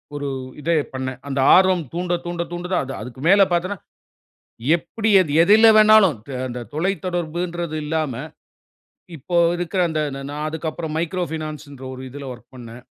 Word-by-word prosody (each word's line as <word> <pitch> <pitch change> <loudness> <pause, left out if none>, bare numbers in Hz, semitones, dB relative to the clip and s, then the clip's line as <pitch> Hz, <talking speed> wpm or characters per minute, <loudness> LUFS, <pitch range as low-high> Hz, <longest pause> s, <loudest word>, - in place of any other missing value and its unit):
ஒரு 145 -1 -4 0.3
இத 155 - -4 0.2
பண்னேன். 130 -1 -4
அந்த 140 -1 -2 0.2
ஆர்வம் 185 -2 +4
தூண்ட, 175 +1 -2
தூண்ட, 175 0 -3
தூண்ட 175 +1 -5
தான். 180 - +1
அது 135 - -6
அதுக்கு 125 +3 -9
மேல 200 +1 +6
பார்த்தீங்கன்னா. 180 +3 -1 0.9
எப்டி 215 +6 -3
அது 160 -6 -3
எதுல 215 +6 +6
வேணாலும் 215 -6 +6 0.2
அ - - -3
அந்த 125 0 -6
தொலைத்தொடர்புன்றது 175 -1 -2
இல்லாம. 155 -3 -1 1.0
இப்போ 175 +5 -4 0.2
இருக்க 175 +2 -4
அந்த 155 -1 -1
நா 135 - -6
நான் 150 +1 -4
அதுக்கு 160 +1 -4
அப்புறம் 155 0 -6
"Micro 175 +2 -2
Finance" 155 -1 -5
ன்ற 135 -1 -11
ஒரு 130 - -8
இதுல 140 +2 -8
வொர்க் 120 0 -15
பண்ணேன். 120 -1 -11
165 Hz, 160 wpm, -21 LUFS, 145-180 Hz, 1.0 s, மேல